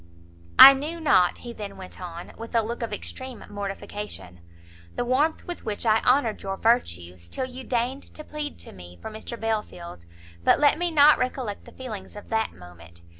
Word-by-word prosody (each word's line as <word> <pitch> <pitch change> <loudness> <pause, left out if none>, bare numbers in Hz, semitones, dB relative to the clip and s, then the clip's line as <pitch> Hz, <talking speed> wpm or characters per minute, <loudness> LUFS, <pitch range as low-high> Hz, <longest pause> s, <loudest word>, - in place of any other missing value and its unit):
"I 275 - +13
knew 300 +5 -4
not," 190 - +4
he 240 -1 -8
then 200 -3 -7
went 185 -1 -10
on, 170 -1 -8
with 230 +1 -8
a 230 - +4
look 235 +3 -5
of 230 - -3
extreme 255 +4 -6
mortification, 200 - -6 0.6
"the - - -1
warmth 285 +6 +1
with 350 - -6
which 215 +1 -3
I 220 0 +4
honoured 245 -4 +2
your 195 0 -4
virtues, 90 - 0
till 260 - -2
you 255 +1 -9
deigned 250 +3 -2
to 305 - -8
plead 300 -1 -5
to - - -12
me 90 -1 -12
for 220 - -7
Mr 220 +2 -8
Belfield, 180 - -4 0.4
but - - +4
let 295 +2 +4
me 350 0 +1
not 300 -2 +6
recollect 250 -5 -3
the - - -13
feelings 225 -8 -8
of 205 - -11
that 220 0 0
moment! 85 -1 -14
220 Hz, 185 wpm, -25 LUFS, 185-260 Hz, 0.6 s, I